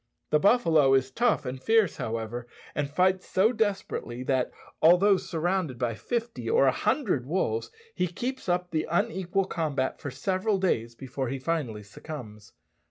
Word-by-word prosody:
The 150 - +4
buffalo 160 - +4
is 130 0 +1
tough 240 - +1
and 130 +1 -5
fierce, 220 -2 +3
however, 115 +2 -4 0.3
and 145 -1 -2
fights 185 +4 +1
so 215 +6 +3
desperately 200 - -2
that, 130 -1 +1 0.3
although 180 +5 +6
surrounded 175 -5 -1
by 120 -1 -1
fifty 235 - -3
or 460 +2 +4
a - - +5
hundred 180 - 0
wolves, 115 -10 -1 0.2
he 180 - 0
keeps 245 +6 -4
up 180 0 0
the 155 -1 -1
unequal 180 +3 0
combat 145 -7 -2
for 145 - -4
several 185 - 0
days 120 -12 0
before 130 0 -4
he 135 - -2
finally 130 -7 -2
succumbs. 105 -1 -10
160 Hz, 155 wpm, -27 LUFS, 130-190 Hz, 0.3 s, although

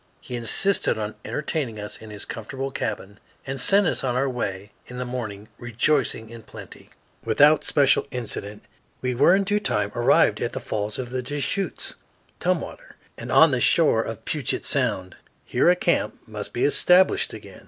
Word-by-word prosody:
He 125 - -7
insisted 120 - +1
on 105 0 -3
entertaining 140 -7 -3
us 105 0 -7
in 110 - -10
his 105 -1 -5
comfortable 135 +4 -5
cabin, 105 -4 -4 0.3
and 135 -1 -4
sent 200 +8 +4
us 160 - -1
on 125 -2 0
our 135 +2 +1
way 105 -5 -4 0.2
in 125 - -9
the 125 - -3
morning, 110 -5 -5
rejoicing 120 -1 0
in 115 -1 -10
plenty. - - -12 0.3
Without 150 +1 +4
special 140 -1 +3
incident 105 -4 -5 0.4
we 125 - 0
in 175 +10 +4
due 205 +1 +1
time 105 - 0
arrived 120 - +3
at - - -2
the - - -3
falls 105 0 -3
of 125 -2 -5
the 130 0 -2
Deschutes 145 +7 -3 0.4
(Tumwater) - - -3 0.2
and - - -7
on - - +7
the - - 0
shore - - +4
of - - -7
Puget - - -2
Sound. 95 0 -1 0.3
Here - - +2
a 180 - +5
camp 175 -1 0
must 105 -2 -6
be 120 - 0
established 180 +5 +4
again. - - -11
125 Hz, 170 wpm, -24 LUFS, 110-145 Hz, 0.4 s, on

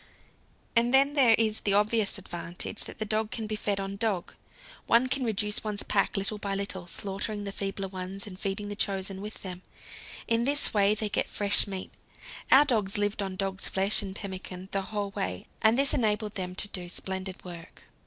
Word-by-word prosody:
And 235 +1 +4
then 275 +2 +5
there 255 -6 +6
is 220 -1 +2
the 200 -1 +2
obvious 210 0 +2
advantage 175 +2 -1
that 215 - -4
dog 215 0 +1
can 225 -1 -4
be 215 0 -2
fed 205 -1 -1
on 195 0 -4
dog. 210 -5 -1 0.5
One 235 +2 +5
can 260 +1 0
reduce 210 -2 +1
one's 210 -2 -2
pack 200 +1 +1
little 200 +2 -1
by 200 -1 -2
little, 195 -3 -3
slaughtering 205 +3 -3
the 200 - -3
feebler 195 0 -3
ones 190 +1 -3
and 185 -3 -9
feeding 200 +1 -3
the 205 - -5
chosen 195 -1 -2
with 210 +1 -8
them. 185 -2 -6 0.7
In 230 0 +2
this 285 +3 +2
way 205 0 +4
they 215 0 0
get 205 - 0
fresh 205 0 +2
meat. 190 -2 -5 0.6
Our 280 +3 +8
dogs 215 -8 +1
lived 205 0 0
on 190 -1 -3
dog's 190 0 -2
flesh 195 +2 +4
and 190 -1 -5
pemmican 190 -2 -7
the 195 - 0
whole 205 0 -3
way, 90 - -3 0.2
and 220 +2 +5
this 275 0 +3
enabled 215 -2 +1
them 180 -2 -4
to 205 - +3
do 180 -3 -3
splendid 190 +1 -5
work. 170 -1 -10
200 Hz, 195 wpm, -28 LUFS, 190-215 Hz, 0.7 s, Our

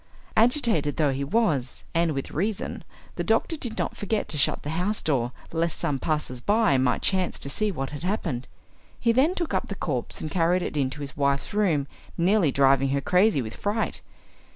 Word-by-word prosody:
Agitated 225 - +3
though 150 -4 +3
he 135 +1 -2
was, 145 - 0
and 165 -1 +2
with 135 -1 -4
reason, 200 +6 -2 0.3
the - - -1
doctor 330 - +1
did 240 -7 -5
not - - -2
forget 210 +1 -1
to - - -4
shut 145 - +1
the 150 - -3
house 180 +6 0
door, 125 -5 0 0.2
lest 165 0 -1
some 140 -2 -1
passers 150 -4 -2
by 210 - +3
might 130 -1 +1
chance 185 -2 +1
to 140 - -2
see 215 +5 0
what 135 -6 -4
had 145 - -7
happened. 170 - -2 0.5
He 230 - +3
then 280 +10 +3
took 340 -4 -2
up - - 0
the - - -5
corpse - - -2
and 155 - -5
carried 180 +1 +2
it - - -4
into 140 0 -1
his 140 -1 -6
wife's 140 +2 0
room, 180 -9 +2 0.3
nearly 175 -2 +3
driving 135 0 +4
her 140 +1 +1
crazy 180 - +3
with 110 0 -7
fright. 210 +2 -2
165 Hz, 195 wpm, -26 LUFS, 140-210 Hz, 0.5 s, driving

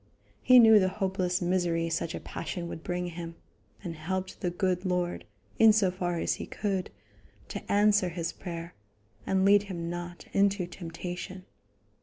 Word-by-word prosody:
He 255 - +7
knew 220 -3 +9
the 185 -1 +2
hopeless 185 -2 -1
misery 175 -2 +1
such 165 0 -2
a - - -4
passion 170 +1 -5
would 165 - -7
bring 180 0 -2
him, 170 -1 -7 0.5
and 170 -3 -5
helped 185 +4 -4
the 180 - 0
good 180 +1 -1
Lord, 180 -2 -1 0.3
in 225 -1 +8
so 205 -4 +3
far 175 -1 -2
as - - 0
he - - -6
could, 195 -3 -2 0.6
to - - -6
answer 205 -2 +4
his 170 -1 -3
prayer, 170 -1 -7 0.5
and 190 0 +2
lead 205 0 +6
him 170 -2 -4
not 175 0 -7
into 200 -1 +2
temptation. 180 +2 -7
180 Hz, 160 wpm, -29 LUFS, 175-195 Hz, 0.6 s, knew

